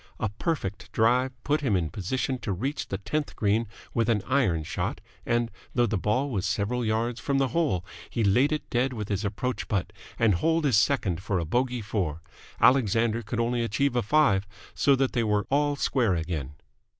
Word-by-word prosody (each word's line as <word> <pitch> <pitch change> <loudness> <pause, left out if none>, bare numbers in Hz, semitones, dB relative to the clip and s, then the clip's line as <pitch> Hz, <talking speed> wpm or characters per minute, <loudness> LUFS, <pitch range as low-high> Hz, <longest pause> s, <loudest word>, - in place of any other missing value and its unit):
A 110 - 0
perfect 105 - -3
drive 125 +4 +3
put 150 +1 +1
him 125 -8 +1
in 80 -4 0
position 130 +6 -2
to 105 - -3
reach 130 +11 -2
the 95 - -3
tenth 150 +9 -3
green 110 +2 +1 0.3
with 115 -1 +1
an 105 -4 +2
iron 115 - +1
shot, - - -3 0.3
and, 120 -1 +1 0.2
though 120 -1 +4
the 110 -1 -1
ball 125 +9 0
was 95 -5 -1
several 100 +6 -1
yards 115 +2 0
from 140 -1 0
the 135 -1 +2
hole, 145 - 0 0.2
he 115 - -1
laid 125 +9 +4
it 155 - -2
dead 130 +2 +1
with 105 -3 -5
his 100 0 -1
approach 110 +5 -2
putt 100 -5 -1 0.2
and 115 -3 +4
holed 160 - +1
his 130 -7 +4
second 110 - +1
for 100 -1 -1
a 85 - -1
bogey 125 +6 0
four. 85 -7 -2 0.4
Alexander 115 -2 +3
could 115 +1 -4
only 120 +1 +1
achieve 125 +4 0
a 120 - +3
five, 105 -6 +3 0.3
so 140 0 +4
that 135 0 0
they 120 - +1
were 105 -2 +1
all 145 +1 +2
square 120 -8 +1
again. 80 -4 -4
115 Hz, 195 wpm, -27 LUFS, 100-130 Hz, 0.4 s, though